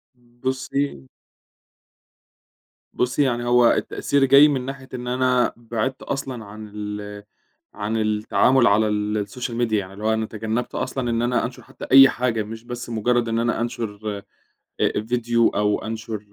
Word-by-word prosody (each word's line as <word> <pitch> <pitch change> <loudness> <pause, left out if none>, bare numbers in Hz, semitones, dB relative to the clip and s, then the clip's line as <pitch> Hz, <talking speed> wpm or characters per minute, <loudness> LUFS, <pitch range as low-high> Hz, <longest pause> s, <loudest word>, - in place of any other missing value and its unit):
بُصي 130 - -4 1.9
بُصي، 125 +4 +1
يعني 120 -3 0
هو 120 -1 +5
التأثير 140 -1 +1
جاي 140 +3 +8
مِن 140 -3 0
ناحية 135 0 -7
إن 125 -1 -5
أنا 125 0 +2
بعدت 120 +2 -3
أصلًا 130 -5 -4
عن 105 +1 -10
ال 105 0 -6 0.5
عن 105 +2 -3
التعامل 110 +3 +3
على 105 +2 +4
السوشيال 105 +3 -2
ميديا 110 -3 +1
يعني 95 -1 -7
اللي 100 +2 -10
هو 110 0 +2
أنا 110 0 -1
تجنبت 110 +2 -4
أصلًا 130 -1 -2
إن 115 0 0
أنا 120 +1 +1
أنشر 120 +1 -8
حتّى - - -10
أي 135 0 +9
حاجة 120 -3 -1
مش 110 +2 -9
بس 120 0 -7
مجرّد 120 +1 +1
إن 115 0 0
أنا 120 0 0
أنشر 110 -3 -4 0.6
آآ - - +3
ڤيديو 115 0 +1
أو 105 +1 +1
أنشر 110 -1 -5
115 Hz, 150 wpm, -22 LUFS, 110-125 Hz, 1.9 s, أي